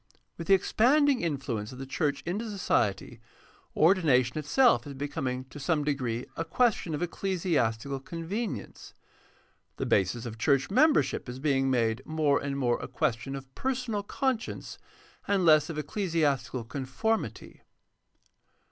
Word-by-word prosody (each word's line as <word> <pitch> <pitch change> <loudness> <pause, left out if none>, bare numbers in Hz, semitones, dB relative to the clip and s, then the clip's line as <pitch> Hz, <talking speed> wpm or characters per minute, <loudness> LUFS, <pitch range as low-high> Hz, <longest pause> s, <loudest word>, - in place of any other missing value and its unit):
With 165 - -7
the 195 - +7
expanding 265 +7 +3
influence 130 -9 -3
of 130 - -10
the 135 - -6
church 140 +2 -1
into 205 +6 -3
society, 115 - -1 0.6
ordination 155 -7 +3
itself 230 - +3
is 140 - -7
becoming 130 -2 -3
to 145 - -10
some 150 +1 0
degree 130 -5 -2
a 165 - -2
question 180 -2 +1
of 155 - -2
ecclesiastical 145 - -1
convenience. 165 - -5 0.8
The - - -2
basis 100 +5 +1
of 115 -1 -7
church 135 - +2
membership 260 - +3
is 125 - -6
being 135 -1 +1
made 115 -3 +1
more 155 -3 +1
and 140 -1 -3
more 125 -3 +1
a - - -5
question 135 -2 -2
of 135 -1 -10
personal 250 -5 -2
conscience 255 +3 -3 0.5
and 195 -3 +2
less 155 0 +5
of 160 - -5
ecclesiastical 150 - -1
conformity. 140 - -3
145 Hz, 135 wpm, -28 LUFS, 130-190 Hz, 0.8 s, the